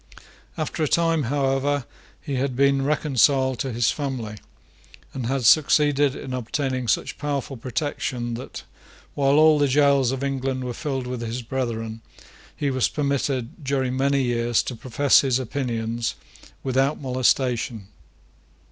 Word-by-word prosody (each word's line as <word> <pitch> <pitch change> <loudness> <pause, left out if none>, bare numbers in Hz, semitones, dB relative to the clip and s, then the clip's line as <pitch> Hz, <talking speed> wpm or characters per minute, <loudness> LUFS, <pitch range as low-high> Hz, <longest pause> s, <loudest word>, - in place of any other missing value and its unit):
After 155 +1 -3
a - - +2
time, 165 -1 +2
however, 140 0 0 0.3
he 140 - -6
had 130 0 -1
been 140 +1 +3
reconciled 135 -3 +2
to 135 - -2
his 120 0 +2
family, 125 -7 -4 0.8
and 125 -3 -4
had 135 -1 -1
succeeded 145 +1 +4
in 130 - -6
obtaining 130 +1 -2
such - - -1
powerful 140 -2 -3
protection 125 -1 -3
that, 120 +3 -7 0.5
while 140 0 +2
all 155 -1 +6
the 145 - +3
gaols 140 -2 +3
of 135 0 -3
England 135 -1 -2
were 125 -1 -4
filled 135 0 -3
with 125 -1 -4
his 120 +2 -4
brethren, 115 -3 -3 0.5
he 140 -1 -1
was 130 -1 +2
permitted, 140 -2 -2
during 130 -2 -1
many 140 +1 +2
years, 120 -1 +1
to 125 - -5
profess 130 +4 +3
his 130 -3 +1
opinions 120 -3 -2 0.5
without 135 +2 +1
molestation. 125 -4 0
130 Hz, 140 wpm, -24 LUFS, 125-140 Hz, 0.8 s, all